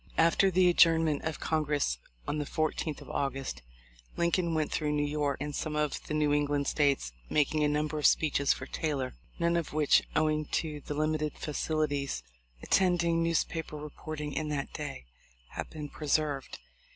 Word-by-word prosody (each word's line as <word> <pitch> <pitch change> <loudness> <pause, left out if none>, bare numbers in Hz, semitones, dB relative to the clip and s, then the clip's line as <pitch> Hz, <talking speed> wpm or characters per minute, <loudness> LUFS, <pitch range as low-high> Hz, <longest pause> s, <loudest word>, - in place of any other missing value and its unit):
After 170 +4 +5
the 185 0 +4
adjournment 165 -3 +4
of 160 -1 -2
Congress 150 - 0 0.3
on 150 - -1
the 145 - -1
14,th 155 -1 -1
of - - -11
August, 135 - -2 0.6
Lincoln 170 -1 +1
went 155 -1 0
through 150 -1 0
New 145 0 +1
York 145 -1 0
and 145 +1 -4
some 155 -1 -3
of 150 -1 0
the 155 - -2
New 150 -1 +2
England 145 -1 +1
States 140 - +1 0.2
making 150 +1 +2
a - - +4
number 150 +1 0
of 150 - +6
speeches 140 -3 +3
for - - -1
Taylor, 140 -5 -2 0.2
none 170 0 +2
of 170 -3 -1
which, 150 -2 +5
owing 155 -1 +2
to 150 0 -2
the 145 - -3
limited 155 0 0
facilities 145 - -1 0.4
attending 170 -3 +3
newspaper 165 -1 -1
reporting 150 0 -6
in 155 +1 -2
that 145 -2 -3
day, 145 - -6 0.4
have - - -6
been 150 -2 -6
preserved. 145 -2 -1
150 Hz, 165 wpm, -30 LUFS, 145-160 Hz, 0.6 s, of